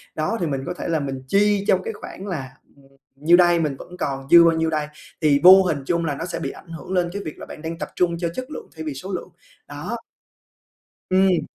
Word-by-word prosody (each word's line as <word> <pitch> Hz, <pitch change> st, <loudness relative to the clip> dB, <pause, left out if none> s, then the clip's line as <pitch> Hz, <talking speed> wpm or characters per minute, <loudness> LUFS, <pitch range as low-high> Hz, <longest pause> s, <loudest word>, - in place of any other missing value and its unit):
đó, 190 Hz, +9 st, -1 dB
thì 170 Hz, -, 0 dB
mình 135 Hz, -3 st, -2 dB
có 180 Hz, -, -3 dB
thể -, -, -4 dB
là 165 Hz, -2 st, +1 dB
mình 135 Hz, -2 st, -4 dB
chi 200 Hz, +4 st, +2 dB
trong 185 Hz, 0 st, +3 dB
cái 225 Hz, -, -4 dB
khoảng 200 Hz, -1 st, -9 dB
là, 145 Hz, -9 st, -4 dB, 0.3 s
ừm, 140 Hz, -1 st, -21 dB, 0.3 s
nhiêu 160 Hz, +5 st, +5 dB
đây, 175 Hz, -1 st, +5 dB
mình 150 Hz, -4 st, -1 dB
vẫn 180 Hz, +5 st, -11 dB
còn 135 Hz, -4 st, -3 dB
dư 170 Hz, 0 st, +10 dB
bao 165 Hz, -1 st, +3 dB
nhiêu 160 Hz, 0 st, +1 dB
đây, 155 Hz, -2 st, -1 dB, 0.3 s
thì 145 Hz, -3 st, +4 dB
vô 190 Hz, +1 st, +10 dB
hình 160 Hz, -6 st, -1 dB
chung 170 Hz, +2 st, 0 dB
là 145 Hz, -3 st, -1 dB
nó 165 Hz, -, -5 dB
sẽ 180 Hz, -, -4 dB
bị -, -, -3 dB
ảnh -, -, -15 dB
hưởng 165 Hz, +2 st, -8 dB
lên 180 Hz, -2 st, +1 dB
cái 200 Hz, -, -4 dB
việc 155 Hz, -, -6 dB
là -, -, -8 dB
bạn -, -, -10 dB
đang 165 Hz, +1 st, -5 dB
tập -, -, -4 dB
trung 170 Hz, -1 st, +1 dB
cho 170 Hz, 0 st, -2 dB
chất 255 Hz, +3 st, -6 dB
lượng -, -, -7 dB
thay 160 Hz, -, -6 dB
vì 150 Hz, -, -3 dB
số 185 Hz, +9 st, -7 dB
lượng, 180 Hz, -, -5 dB, 0.4 s
đó. 150 Hz, +11 st, -5 dB, 1.1 s
Ừm. 185 Hz, -2 st, +3 dB
170 Hz, 255 wpm, -22 LUFS, 150-185 Hz, 1.1 s, dư